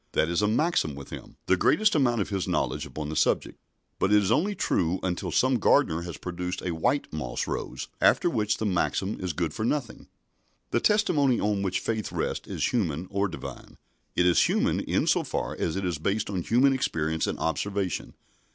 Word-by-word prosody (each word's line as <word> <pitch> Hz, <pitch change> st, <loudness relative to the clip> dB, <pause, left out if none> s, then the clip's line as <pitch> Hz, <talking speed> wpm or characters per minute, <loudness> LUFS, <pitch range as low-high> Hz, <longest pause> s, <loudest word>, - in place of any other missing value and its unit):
That 80 Hz, -, +2 dB
is 85 Hz, +3 st, +1 dB
a 105 Hz, -, +3 dB
maxim 110 Hz, -, +1 dB
with 70 Hz, -1 st, -10 dB
him -, -, -9 dB
the 95 Hz, -, +4 dB
greatest 210 Hz, -, +3 dB
amount 120 Hz, -7 st, +2 dB
of -, -, -2 dB
his 95 Hz, -3 st, -2 dB
knowledge -, -, -1 dB
upon 75 Hz, -1 st, -6 dB
the 80 Hz, -, -4 dB
subject. 75 Hz, -, +1 dB, 0.4 s
But 95 Hz, -, +2 dB
it 105 Hz, -, +7 dB
is 95 Hz, -, 0 dB
only 180 Hz, -, +2 dB
true 90 Hz, -, 0 dB
until 90 Hz, -2 st, -2 dB
some 130 Hz, -1 st, +2 dB
gardener 80 Hz, -4 st, +3 dB
has 85 Hz, -1 st, -6 dB
produced 90 Hz, +1 st, -4 dB
a 90 Hz, -, -2 dB
white 125 Hz, -, 0 dB
moss 65 Hz, -6 st, -3 dB
rose, 65 Hz, -, -4 dB
after -, -, +4 dB
which 105 Hz, -9 st, 0 dB
the 110 Hz, -, -2 dB
maxim 95 Hz, +1 st, 0 dB
is 90 Hz, -1 st, -2 dB
good 80 Hz, 0 st, -2 dB
for -, -, -3 dB
nothing." 125 Hz, 0 st, -2 dB, 0.6 s
The 120 Hz, -, +2 dB
testimony 150 Hz, -, +3 dB
on 105 Hz, -1 st, 0 dB
which 95 Hz, -2 st, 0 dB
faith 110 Hz, -4 st, -2 dB
rests -, -, -3 dB
is -, -, -1 dB
human 90 Hz, -7 st, -1 dB
or 100 Hz, 0 st, +1 dB
Divine. -, -, -9 dB, 0.4 s
It 90 Hz, -, +3 dB
is 90 Hz, -1 st, +5 dB
human -, -, +1 dB
in -, -, 0 dB
so -, -, +3 dB
far -, -, -3 dB
as 80 Hz, -, -2 dB
it 95 Hz, 0 st, -2 dB
is 85 Hz, -4 st, -2 dB
based 100 Hz, +5 st, -1 dB
on 95 Hz, -3 st, -1 dB
human 125 Hz, +9 st, +3 dB
experience 80 Hz, -10 st, -1 dB
and -, -, -2 dB
observation. 95 Hz, +4 st, -2 dB
95 Hz, 200 wpm, -27 LUFS, 85-120 Hz, 0.6 s, it